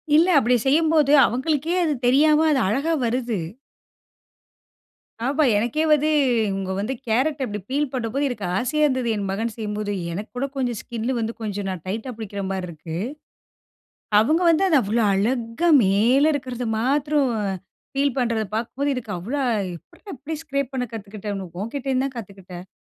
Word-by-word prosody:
இல்ல 325 +3 +5
அப்படி 250 -1 +2
செய்யும்போது, 305 0 +3
அவுங்களுக்கே 300 +6 0
அது 305 - +1
தெரியாம 300 +4 +5
அது 275 - +3
அழகா 275 +11 0
வருது! 235 -3 -1 1.9
ஆமா. 285 +4 +2
எனக்கே 240 +9 0
வந்து, 305 +1 +4 0.4
இவுங்க 195 -1 -3
வந்து, 215 +6 -2
கேரட் 270 +7 +1
அப்படி 210 -2 -5
பீல் 285 0 0
பண்ணும்போது, 255 +3 -1
எனக்கு 210 -6 -4
ஆசையா 285 +7 0
இருந்தது, 260 -3 0
என் 200 -1 -3
மகன் 220 +3 -2
செய்யும்போது. 210 -2 -3 0.2
எனக்கு 205 +5 -6
கூட 275 - 0
கொஞ்சம் 245 -4 -1
ஸ்கின் 235 -1 -4
வந்து, 225 0 -2
கொஞ்சம் 205 -2 -3
நான் 185 -3 -5
டைட்டா 220 +6 -3
பிடிக்கிற 205 -3 -5
மாதிரி 190 -2 -3
இருக்கு, 160 0 -7 1.2
அவங்க 310 +11 +2
வந்து 330 +3 +3
அத 325 -5 +4
அவ்ளோ 225 +3 +1
அழகா 230 - 0 0.2
மேல 225 +9 +3
இருக்குறத 255 -3 -4
மாத்ரம் 285 +2 +1 0.7
பீல் 280 -2 +1
பண்றத 230 -3 +1
பாக்கும் 230 +3 -4
போது 285 0 +1
எனக்கு 225 -4 -5
அவ்ளோ, 230 +12 -3 0.4
எப்பிட்றா 385 - -13
இப்படி 310 +5 -5
ஸ்க்ரேப் 280 -3 -2
பண்ண 255 -1 -1
கத்துக்கிட்டனு, 205 -2 -6
உன்கிட்டந்துதான் 265 +2 -2
கத்துக்கிட்டேன்."நீ 190 -4 -10
245 Hz, 145 wpm, -23 LUFS, 210-280 Hz, 1.9 s, இல்ல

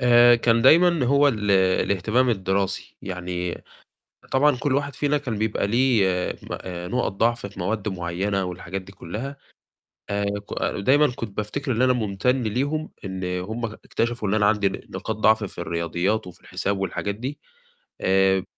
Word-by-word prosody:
آآ، 120 -1 +7
كان 115 0 +2
دايمًا 170 +1 +6
هو 140 +2 +5
ال 105 -5 -1
الاهتمام 100 +5 +2
الدراسي، 95 -2 -1
يعني 90 -1 -4 0.7
طبعًا 140 0 +4
كلّ 130 +2 0
واحد 140 0 -1
فينا 145 +3 +1
كان 125 -7 -4
بيبقى 110 -2 0
ليه 120 -1 +3 0.4
م - - -12
آآ 90 -1 -6
نقط 125 -2 0
ضعف 115 +1 0
في 100 - -12
مواد 105 +3 -1
معيّنة 95 +2 -2
والحاجات 90 +1 -5
دي 95 +1 -14
كلّها، 115 +10 -6 0.7
آآ 100 0 0 0.2
ك - - -9 0.2
دايمًا 140 +8 +4
كنت 105 -4 -6
بافتكر 130 +6 -2
إن 115 +1 +1
أنا 130 0 +5
ممتن 125 +3 0
ليهم 140 +8 -1
إن 95 -1 -4 0.2
هُم 115 +4 -3
ك - - -16
اكتشفوا 120 -2 -1
إن 105 - +1
أنا 105 -1 +3
عندي 105 -1 +3
ن - - -6
نقاط - - -4
ضعف 110 0 +3
في 95 - -8
الرياضيات 85 +6 -1
وفي 90 - -12
الحساب 100 0 -2
والحاجات 100 +1 -2
دي، 130 +7 -5 0.6
آآ، 95 0 +3
105 Hz, 165 wpm, -24 LUFS, 95-125 Hz, 0.7 s, آآ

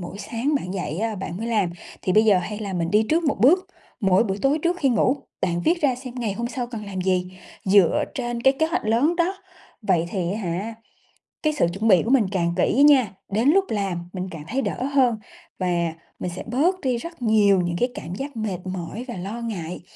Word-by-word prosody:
mỗi 180 +3 -7
sáng 235 +8 -2
bạn 195 -9 -2
dậy 160 -3 -3
á 225 +1 -1
bạn 190 -3 -5
mới 225 +4 -4
làm 210 -6 +1 0.3
thì 185 - 0
bây 215 +2 +5
giờ 205 -4 +5
hay 205 +3 -4
là 205 -3 -4
mình 170 -2 -1
đi 215 +1 +3
trước 330 +1 +2
một 285 - 0
bước, 360 +10 +5 0.3
mỗi 195 +1 +4
buổi 195 -1 -2
tối 275 +3 +3
trước 350 +1 +1
khi 275 - +2
ngủ, 250 +3 +2 0.2
bạn 175 -1 0
viết 340 +1 +2
ra 275 -4 +3
xem 250 0 -9
ngày 225 -4 -1
hôm 235 +4 -3
sau 245 -1 -3
cần 225 -3 -7
làm 190 -2 -5
gì, 185 0 -1 0.3
dựa 190 -3 +4
trên 240 -2 -3
cái 265 +1 +6
kế 315 - +3
hoạch 330 -6 -2
lớn 245 +10 +2
đó. 350 +3 +1 0.5
Vậy 175 -5 +2
thì 180 -3 -1
á 210 - -3
hả, 195 +5 -3 0.7
cái 305 0 +2
sự 230 - +2
chuẩn 215 +4 -1
bị 185 -5 +6
của 230 - -3
mình 260 -6 +5
càng 170 -3 0
kỹ 255 +9 +3
nha, 270 -8 +6 0.2
đến 225 +7 +2
lúc 385 +4 +4
làm 185 -5 -2
mình 185 -1 -4
càng 155 -3 -8
thấy 265 +3 -1
đỡ 255 - -3
hơn 250 -5 +4 0.4
và 170 -3 0 0.3
mình 180 - -3
sẽ - - -6
bớt 315 +11 +1
đi 255 -4 0
rất 335 +3 -8
nhiều 210 -4 +4
những 175 -1 -2
cái 245 - +2
cảm 170 +4 -6
giác 275 -1 -6
mệt 205 -5 -2
mỏi 185 +6 -5
và 240 - -5
lo 200 +6 -5
ngại, 180 -8 -5
215 Hz, 235 wpm, -23 LUFS, 185-255 Hz, 0.7 s, cái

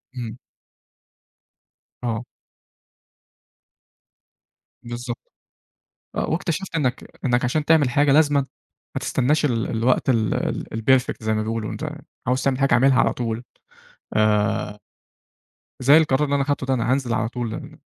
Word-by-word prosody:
امم. 120 -2 -5 1.7
آه. 115 -1 -2 2.6
بالضبط. 120 0 -7 0.8
آه، - - -1
واكتشفت 175 +2 -2
إنك 130 -5 -1 0.2
إنك 125 -1 +2
عشان 145 +5 0
تعمل 150 -4 +4
حاجة 145 +1 +3
لازمًا 145 -1 +4 0.5
ما - - 0
تستناش 145 +4 +1
ال 115 -5 +1
الوقت 120 +4 +2
ال 110 -4 +1
ال - - -2
الperfect 130 +3 +2
زي 110 - +1
ما 110 - 0
بيقولوا، 110 0 -3
أنت 155 -1 -4 0.4
عاوز 125 +2 +1
تعمل 135 -2 +1
حاجة 135 -2 +2
اعملها 130 +2 +5
على - - +3
طول، 115 -1 -3 0.7
آآ، 105 -1 +1 1.0
زي 140 +4 +6
القرار 150 -3 +3
اللي 145 -1 +1
أنا 140 - +2
خدته 140 -1 -1
ده، 135 - +1
أنا 120 -1 0
هانزل 130 -3 0
على 110 0 0
طول، 120 -2 -4
ال - - -9
125 Hz, 135 wpm, -23 LUFS, 115-140 Hz, 2.6 s, زي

